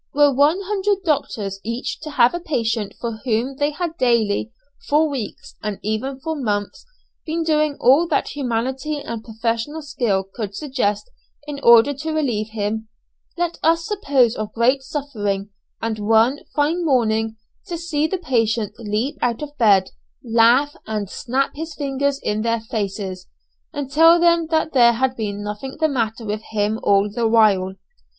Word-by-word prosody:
Were 290 -1 +5
one 295 +8 +3
hundred 400 0 -1
doctors 215 - -1
each 230 +3 -4
to 310 - -7
have 250 -3 +4
a 345 - -2
patient 230 - -2
for 230 -2 -4
whom 250 +2 -1
they 290 0 +1
had 330 +2 -4
daily, 215 - +1 0.4
for 305 +2 +4
weeks, 270 -7 -6
and 210 -2 -3
even 240 +6 -2
for 320 +1 -3
months, 205 - -3 0.4
been 330 +1 -2
doing 305 -2 +1
all 280 +7 +5
that 305 -4 0
humanity 265 +3 -2
and 230 -5 -6
professional 230 +7 -3
skill 220 -9 0
could 200 +1 -6
suggest 260 - -2 0.3
in 295 -1 -6
order 235 +3 +6
to 310 +3 -4
relieve 240 -9 -1
him, 220 0 -3 0.5
let 345 -1 -2
us 330 +1 +2
suppose 275 - +2
of 215 -1 -4
great 250 +4 +2
suffering, 210 -9 -3 0.3
and 225 -1 -2
one 225 +6 +3 0.2
fine 310 +4 +1
morning 225 -6 +1 0.3
to 345 - -4
see 320 -2 -1
the 380 - -2
patient 225 - 0
leap 230 +7 -2
out 240 +3 0
of 290 0 -8
bed, 200 -5 +4 0.3
laugh, 240 +5 +4
and 210 -3 -3
snap 265 +2 -1
his 320 0 -6
fingers 280 -1 -1
in 210 +1 -1
their 230 0 0
faces, 195 -4 -4 0.4
and 285 -3 -5
tell 330 +3 +6
them 340 -1 +3
that 315 0 0
there 240 -3 +6
had 255 +2 0
been 205 -3 -4
nothing 210 +6 -6
the 315 - +3
matter 230 -5 -2
with 210 0 -3
him 210 +1 0
all 200 0 +3
the 225 +3 -1
while! 205 -4 +3
245 Hz, 160 wpm, -21 LUFS, 220-295 Hz, 0.5 s, order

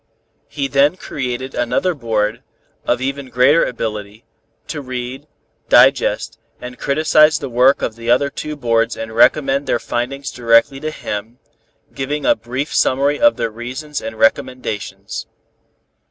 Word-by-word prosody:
He 140 -2 -3
then 140 +4 +3
created 130 -4 -5
another 120 +9 0
board, 115 -4 -1 0.5
of 120 +1 +1
even 135 0 -3
greater 130 +6 +4
ability, 110 -2 -5 0.4
to 150 -2 -4
read, 130 +2 -6 0.4
digest - - +3 0.2
and 125 0 -9
criticise 155 +1 +4
the 140 -4 -6
work 125 +3 +4
of 110 - -2
the 115 0 -6
other 140 +4 +3
two 150 0 -5
boards 115 -4 0
and 110 0 -6
report 135 +3 +3
their - - +2
findings 130 +4 -4
directly 120 +3 +3
to 155 +2 -3
him, 110 -5 -6 0.6
giving 145 +2 -3
a - - +5
brief 125 +6 -5
summary 140 +3 +2
of 295 0 +5
their 115 - -2
reasons 130 +6 -6
and 110 0 -6
recommendations. 110 -1 -1
130 Hz, 140 wpm, -18 LUFS, 115-140 Hz, 0.6 s, a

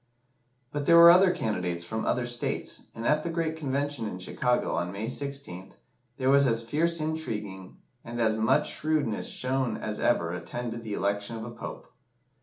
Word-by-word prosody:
But 145 -1 -3
there 170 - +7
were 170 0 +11
other 185 +2 +6
candidates 90 - -1
from 110 +6 -3
other 125 -1 +1
states, 120 0 -3
and 115 - -6
at 150 +3 +3
the 170 - -3
great 165 -1 -1
Convention 140 -5 -2
in 90 - -5
Chicago, 125 +7 0
on 85 +1 -1
May 100 +3 -4
16th, 135 -8 -5 0.4
there 130 0 +2
was 140 -1 +5
as 115 -1 0
fierce 165 +7 0
intriguing 105 -12 -4 0.3
and 120 +1 -6
as 110 -2 +3
much 110 +1 +2
shrewdness 150 -8 -1
shown 130 -2 -1
as 105 -1 -4
ever 85 -8 +1
attended 115 +5 -5
the 110 -2 -5
election 100 +3 -1
of 110 0 -6
a 120 - -7
Pope. - - -8
120 Hz, 175 wpm, -28 LUFS, 105-145 Hz, 0.4 s, were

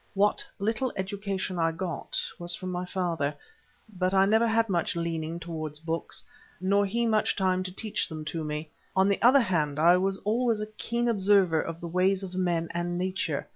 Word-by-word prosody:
What 205 +1 +3
little 225 +5 0
education 190 -1 -3
I 165 0 +2
got 170 +1 -3 0.2
was 175 0 -1
from 185 0 -5
my 180 0 -3
father, 170 -6 -1 0.6
but 185 +1 +1
I 190 0 +6
never 220 +3 +4
had 225 0 +2
much 175 -3 0
leaning 165 -1 -2
towards 160 -3 -5
books, 165 +1 -4 0.4
nor 200 +2 +2
he 235 +4 0
much 215 -2 +2
time 185 -1 +1
to 185 0 -4
teach 210 +3 -1
them 155 -1 -6
to 160 +1 -3
me. 150 +1 -4 0.2
On 190 +1 +4
the 200 - +1
other 260 +3 +7
hand, 155 -9 0
I 170 +3 +6
was 195 +1 0
always 230 +1 +2
a 210 - -2
keen 235 +2 -1
observer 195 -6 +4
of 165 0 -6
the 170 - -6
ways 185 +3 +2
of 185 -1 -6
men 175 -3 0
and 175 +1 -2
nature. 180 -5 -2
185 Hz, 190 wpm, -28 LUFS, 165-200 Hz, 0.6 s, other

